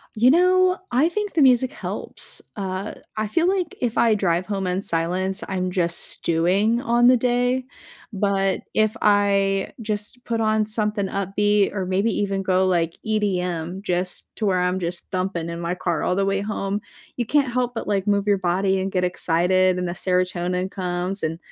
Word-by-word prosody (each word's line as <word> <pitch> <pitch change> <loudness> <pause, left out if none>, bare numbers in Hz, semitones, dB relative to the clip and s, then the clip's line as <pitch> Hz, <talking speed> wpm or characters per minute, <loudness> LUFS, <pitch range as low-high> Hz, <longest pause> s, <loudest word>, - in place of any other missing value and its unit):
You 240 +4 +5
know, 365 +2 +4
I 265 +6 +3
think 415 +3 -3
the 320 - +2
music 255 -1 +4
helps, - - -5
uh, 195 -1 -4 0.2
I 215 0 -1
feel 335 - +1
like 370 -3 0
if 240 -3 -1
I 225 -2 +4
drive 180 -2 0
home 195 -2 -2
in 180 +1 -1
silence, 185 +2 -1
I'm 185 -1 -2
just 170 -2 0
stewing 190 +8 +1
on 240 +1 +3
the 255 - +7
day, 245 +1 +1 0.5
but 195 -2 0
if 215 +1 +2
I 200 -1 +2
just 210 +4 -4
put 230 -1 -1
on 215 -1 +2
something 210 -1 -1
upbeat 200 +2 +1
or 190 -2 -1
maybe 195 +5 +1
even 195 -1 -1
go 190 0 +2
like 170 -3 0
EDM 185 -4 -1
just 180 -2 -3
to 215 - 0
where 185 -1 +2
I'm 180 +1 0
just 175 +1 -5
thumping 185 -3 -2
in 170 0 -5
my 170 +1 -2
car 175 -3 -1
all 180 - 0
the 195 +1 +1
way 195 0 0
home, 205 0 -2 0.4
you 240 - -1
can't 280 -2 +2
help 245 -1 -1
but, - - -4
like, 200 -1 0
move 200 -1 +2
your 200 -1 +3
body 190 +2 +1
and 190 +1 -2
get 185 -1 0
excited 180 +1 +2
and 180 -1 -2
the 175 - -3
serotonin 180 0 -1
comes 180 +1 -3
and, 160 +1 -2
195 Hz, 185 wpm, -23 LUFS, 180-215 Hz, 0.5 s, the